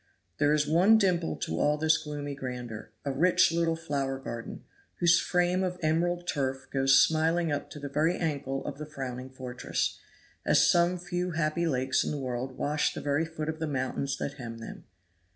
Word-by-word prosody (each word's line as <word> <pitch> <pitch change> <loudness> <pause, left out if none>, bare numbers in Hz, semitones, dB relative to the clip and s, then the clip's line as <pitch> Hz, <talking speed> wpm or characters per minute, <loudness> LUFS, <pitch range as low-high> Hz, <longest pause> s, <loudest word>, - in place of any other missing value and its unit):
There 145 0 +4
is 150 0 +3
one 185 +9 +5
dimple 175 - +1
to 80 +2 -3
all 150 +1 +2
this 160 +1 +3
gloomy 145 -2 -5
grandeur 125 -5 -6 0.2
a 140 - 0
rich 165 +5 +4
little 165 0 +1
flower 140 -5 -2
garden, 115 -3 -7 0.3
whose 170 0 +4
frame 180 +1 +1
of 180 -1 -2
emerald 175 +3 +1
turf 135 -4 -2
goes 135 0 +5
smiling 160 +1 +3
up 145 0 -3
to 150 - -9
the 140 - -5
very 155 +5 +1
ankle 140 -4 -2
of 140 -1 -5
the 150 - -6
frowning 130 -3 -6
fortress, 130 -1 -3 0.4
as - - +4
some 175 +1 +3
few 175 0 -3
happy 160 +2 0
lakes 130 -3 +1
in - - -2
the 150 - -2
world 130 -1 -4
wash 150 +1 0
the - - -4
very 145 +3 +1
foot 160 -1 -5
of 160 0 -3
the 160 - -2
mountains 135 0 -2
that 140 0 -5
hem 115 -2 -6
them. 115 - -9
150 Hz, 190 wpm, -29 LUFS, 135-165 Hz, 0.4 s, one